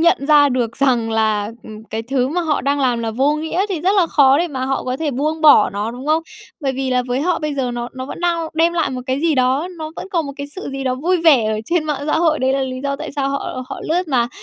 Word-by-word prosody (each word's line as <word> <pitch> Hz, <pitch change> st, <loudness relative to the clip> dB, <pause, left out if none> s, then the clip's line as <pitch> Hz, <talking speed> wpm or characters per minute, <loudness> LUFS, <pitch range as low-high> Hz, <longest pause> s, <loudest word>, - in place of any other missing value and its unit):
nhận 330 Hz, -4 st, +3 dB
ra 295 Hz, -1 st, +6 dB
được 245 Hz, -3 st, -1 dB
rằng 245 Hz, -5 st, +1 dB
là, 215 Hz, -2 st, 0 dB
ừm, 215 Hz, 0 st, -11 dB
cái 225 Hz, 0 st, -5 dB
thứ 255 Hz, +1 st, 0 dB
mà 345 Hz, +5 st, -1 dB
họ 315 Hz, -4 st, 0 dB
đang 285 Hz, +1 st, 0 dB
làm 250 Hz, -3 st, +1 dB
là 230 Hz, -1 st, -2 dB
vô 270 Hz, +6 st, +1 dB
nghĩa 320 Hz, +5 st, -1 dB
thì 370 Hz, -6 st, -2 dB
rất 365 Hz, +4 st, +2 dB
là 370 Hz, -4 st, +4 dB
khó 280 Hz, -3 st, +4 dB
để 345 Hz, +2 st, 0 dB
mà 260 Hz, -4 st, -3 dB
họ 270 Hz, +1 st, -2 dB
có 255 Hz, 0 st, -2 dB
thể 310 Hz, +1 st, -2 dB
buông 305 Hz, +5 st, -2 dB
bỏ 300 Hz, -8 st, +6 dB
nó, 205 Hz, +3 st, -3 dB
đúng 250 Hz, +4 st, -9 dB
không? 315 Hz, +2 st, +2 dB, 0.4 s
Bởi 275 Hz, -3 st, -1 dB
vì 265 Hz, 0 st, -2 dB
là 250 Hz, 0 st, +2 dB
với 250 Hz, +1 st, -1 dB
họ 345 Hz, +2 st, +1 dB
bây 300 Hz, -1 st, -3 dB
giờ 260 Hz, -3 st, -1 dB
nó 240 Hz, 0 st, -4 dB
nó 260 Hz, 0 st, -5 dB
vẫn -, -, -8 dB
đang 340 Hz, -2 st, 0 dB
đem 330 Hz, +2 st, +3 dB
lại 335 Hz, -2 st, 0 dB
một 255 Hz, -1 st, -4 dB
cái 260 Hz, +1 st, -1 dB
gì 325 Hz, -1 st, +2 dB
đó, 260 Hz, +5 st, +1 dB
nó 310 Hz, -1 st, -5 dB
vẫn -, -, -7 dB
còn 340 Hz, -6 st, -1 dB
một 280 Hz, -, -6 dB
cái 285 Hz, -, -5 dB
sự 380 Hz, -, -6 dB
gì 270 Hz, 0 st, -5 dB
đó 255 Hz, -1 st, 0 dB
vui 335 Hz, +8 st, +1 dB
vẻ 285 Hz, -9 st, +5 dB
ở 215 Hz, -, -2 dB
trên 340 Hz, -2 st, +1 dB
mạng 295 Hz, -2 st, -2 dB
xã 305 Hz, -, +1 dB
hội 320 Hz, -2 st, +2 dB
đấy 260 Hz, +1 st, +1 dB
là 275 Hz, -, 0 dB
lý 255 Hz, -1 st, -4 dB
do 280 Hz, 0 st, -1 dB
tại 310 Hz, +1 st, -7 dB
sao 275 Hz, -1 st, 0 dB
họ 275 Hz, -2 st, -4 dB
họ -, -, -6 dB
lướt 350 Hz, +2 st, 0 dB
mà. 240 Hz, -4 st, +1 dB
275 Hz, 295 wpm, -19 LUFS, 255-315 Hz, 0.4 s, ra